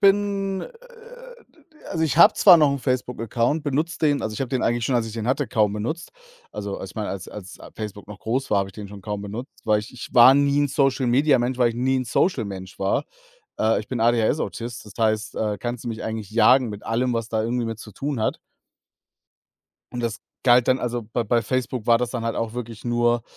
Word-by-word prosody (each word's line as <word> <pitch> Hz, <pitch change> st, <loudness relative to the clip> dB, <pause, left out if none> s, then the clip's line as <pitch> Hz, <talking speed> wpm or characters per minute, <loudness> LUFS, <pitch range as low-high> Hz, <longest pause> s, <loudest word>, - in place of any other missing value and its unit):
bin 195 Hz, -1 st, +2 dB
äh, -, -, -7 dB, 0.8 s
d -, -, -26 dB, 0.3 s
also, 165 Hz, -3 st, -1 dB
ich 155 Hz, 0 st, -1 dB
habe -, -, +8 dB
zwar 185 Hz, -4 st, +8 dB
noch 150 Hz, -3 st, +5 dB
'n 140 Hz, -, -1 dB
Facebook-Account, 125 Hz, +2 st, -1 dB
benutze 155 Hz, +3 st, -1 dB
den 145 Hz, -3 st, +2 dB
also, 110 Hz, -1 st, -3 dB
ich -, -, -6 dB
habe 135 Hz, -, -1 dB
den 130 Hz, 0 st, -1 dB
eigentlich 120 Hz, 0 st, +1 dB
schon, 130 Hz, -, 0 dB
als 120 Hz, -2 st, +1 dB
ich 110 Hz, -, -7 dB
den 110 Hz, 0 st, -4 dB
hatte, 135 Hz, +2 st, +1 dB
kaum 105 Hz, -3 st, +1 dB
benutzt. 120 Hz, +11 st, -4 dB, 0.4 s
Also, 100 Hz, -1 st, -4 dB
als 95 Hz, -, -8 dB
meine 105 Hz, -2 st, -3 dB
als 95 Hz, -1 st, -5 dB
als 100 Hz, -2 st, -10 dB, 0.2 s
Facebook 105 Hz, -2 st, -7 dB
noch 105 Hz, -2 st, -9 dB
groß 125 Hz, +7 st, -2 dB
war, 105 Hz, -, +3 dB
habe 100 Hz, 0 st, -1 dB
ich -, -, -13 dB
den 105 Hz, 0 st, -8 dB
schon 100 Hz, 0 st, -10 dB
kaum 105 Hz, 0 st, -5 dB
benutzt, 110 Hz, +6 st, -8 dB
weil 110 Hz, -1 st, +3 dB
ich 105 Hz, -, -11 dB
ich 125 Hz, -, -8 dB
war 125 Hz, +2 st, +8 dB
nie 140 Hz, 0 st, +3 dB
'n 145 Hz, -, +2 dB
Social-Media-Mensch, 130 Hz, -1 st, +2 dB
weil 120 Hz, -2 st, +4 dB
ich -, -, -8 dB
nie 130 Hz, +2 st, +1 dB
'n 130 Hz, -, -1 dB
Social-Mensch 100 Hz, -, -1 dB
war. 95 Hz, 0 st, 0 dB, 0.5 s
Äh, 110 Hz, +1 st, +2 dB
ich 105 Hz, -, -11 dB
bin 125 Hz, -3 st, -3 dB
ADHS-Autist. 120 Hz, 0 st, 0 dB
Das 105 Hz, -, -11 dB
heißt, 110 Hz, 0 st, 0 dB
äh, 105 Hz, -1 st, -1 dB
kannst 120 Hz, +3 st, -5 dB
du -, -, -3 dB
mich 115 Hz, -1 st, -5 dB
eigentlich 110 Hz, -3 st, -5 dB
jagen 125 Hz, +3 st, +5 dB
mit 105 Hz, -1 st, -8 dB
allem, 125 Hz, +2 st, 0 dB
was 115 Hz, -1 st, -2 dB
da 110 Hz, -1 st, 0 dB
irgendwie 120 Hz, +1 st, -1 dB
mit 115 Hz, -1 st, -5 dB
zu 110 Hz, -1 st, -11 dB
tun 135 Hz, +2 st, -3 dB
hat. 110 Hz, -, 0 dB, 1.5 s
Und 120 Hz, -, -4 dB
das 115 Hz, -1 st, -3 dB, 0.2 s
galt 125 Hz, -1 st, +5 dB
dann 130 Hz, -, +4 dB
also, 120 Hz, -1 st, -2 dB
bei 115 Hz, +2 st, -3 dB
bei 115 Hz, +2 st, +2 dB
Facebook 130 Hz, -1 st, -2 dB
war 115 Hz, -1 st, +5 dB
das 125 Hz, -1 st, -2 dB
dann 120 Hz, -2 st, -4 dB
halt 115 Hz, -, -2 dB
auch 115 Hz, 0 st, -3 dB
wirklich 115 Hz, -2 st, -7 dB
nur, 120 Hz, 0 st, +1 dB
120 Hz, 225 wpm, -23 LUFS, 110-130 Hz, 1.5 s, habe